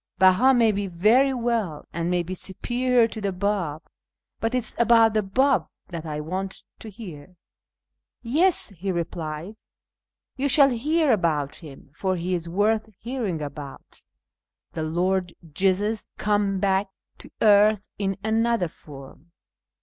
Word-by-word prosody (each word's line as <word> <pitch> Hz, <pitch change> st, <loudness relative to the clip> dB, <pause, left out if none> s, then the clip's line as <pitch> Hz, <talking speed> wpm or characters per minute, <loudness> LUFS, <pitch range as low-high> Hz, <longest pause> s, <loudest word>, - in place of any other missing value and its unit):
Beha 190 Hz, +9 st, +5 dB
may 230 Hz, -2 st, +4 dB
be 200 Hz, -1 st, -2 dB
very 215 Hz, +10 st, +3 dB
well, 230 Hz, -, -2 dB
and 170 Hz, +1 st, -2 dB
may 180 Hz, -1 st, +1 dB
be 180 Hz, +2 st, -6 dB
superior 240 Hz, +6 st, +1 dB
to 220 Hz, -1 st, -7 dB
the 200 Hz, -1 st, -1 dB
Bab, 180 Hz, -5 st, -2 dB, 0.6 s
but 225 Hz, +2 st, -1 dB
it 250 Hz, -, +1 dB
is -, -, -1 dB
about 230 Hz, -2 st, +5 dB
the 215 Hz, -, +2 dB
Bab 260 Hz, +8 st, +2 dB, 0.2 s
that 165 Hz, -2 st, -6 dB
I 150 Hz, -1 st, -4 dB
want 190 Hz, +5 st, -5 dB, 0.2 s
to 220 Hz, -, -9 dB
hear." 185 Hz, -6 st, -11 dB, 0.5 s
" 60 Hz, 0 st, -61 dB
Yes," 320 Hz, +10 st, +2 dB
he 195 Hz, 0 st, -4 dB
replied, 170 Hz, +2 st, -5 dB, 0.4 s
" -, -, -67 dB
you 280 Hz, +2 st, 0 dB
shall 275 Hz, 0 st, +6 dB
hear 300 Hz, +5 st, +1 dB
about 160 Hz, -9 st, 0 dB
him, 140 Hz, -4 st, -13 dB
for 185 Hz, +4 st, -1 dB
he 180 Hz, +1 st, -2 dB
is 170 Hz, -1 st, -3 dB
worth 215 Hz, +4 st, +1 dB
hearing 220 Hz, -, -3 dB
about 140 Hz, -1 st, -9 dB, 0.3 s
— -, -, -66 dB
the 160 Hz, -, -4 dB
Lord 175 Hz, +3 st, 0 dB, 0.2 s
Jesus 200 Hz, +5 st, 0 dB
come 205 Hz, -2 st, 0 dB
back 195 Hz, 0 st, +1 dB, 0.3 s
to -, -, -12 dB
earth 210 Hz, -1 st, +4 dB
in 195 Hz, -1 st, -1 dB
another 225 Hz, -3 st, +1 dB
form. 145 Hz, +2 st, -14 dB
195 Hz, 150 wpm, -24 LUFS, 170-225 Hz, 0.6 s, shall